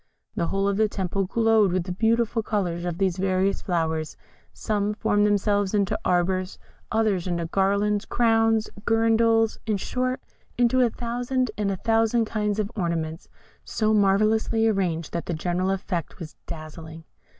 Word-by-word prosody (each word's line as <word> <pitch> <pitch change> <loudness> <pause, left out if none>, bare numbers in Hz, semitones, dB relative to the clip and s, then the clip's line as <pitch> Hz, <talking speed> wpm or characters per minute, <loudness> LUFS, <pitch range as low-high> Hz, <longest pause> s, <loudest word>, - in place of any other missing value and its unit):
The 170 - -1
whole 195 +2 0
of 200 -1 0
the 215 0 +2
temple 195 0 -2
glowed 220 -1 +3
with 180 -1 0
the 180 - -6
beautiful 225 +3 +1
colours 180 -6 -2
of 175 -1 -3
these 190 -2 0
various 190 +1 0
flowers; 160 -3 -2 0.3
some 210 -1 -2
formed 205 -1 +2
themselves 205 -1 +1
into 205 +1 0
arbours, 185 +1 0 0.3
others 215 -5 +1
into 170 -1 -1
garlands, 200 +4 +1
crowns, 225 -2 +2 0.2
girandoles, 225 0 +3
in 215 -2 +1
short, 255 +6 -2 0.4
into 245 +1 +3
a 245 - +4
thousand 245 +2 -2
and 210 -2 -1
a 195 - -2
thousand 225 +2 +2
kinds 210 -2 -2
of 210 -1 -2
ornaments, 165 -4 -3 0.3
so 215 -1 0
marvellously 215 +2 +2
arranged 180 -6 -1
that 170 - -3
the 170 - -2
general 180 +3 -1
effect 185 -4 -3
was 155 -4 -9
dazzling. 160 0 -9
200 Hz, 150 wpm, -25 LUFS, 180-225 Hz, 0.4 s, a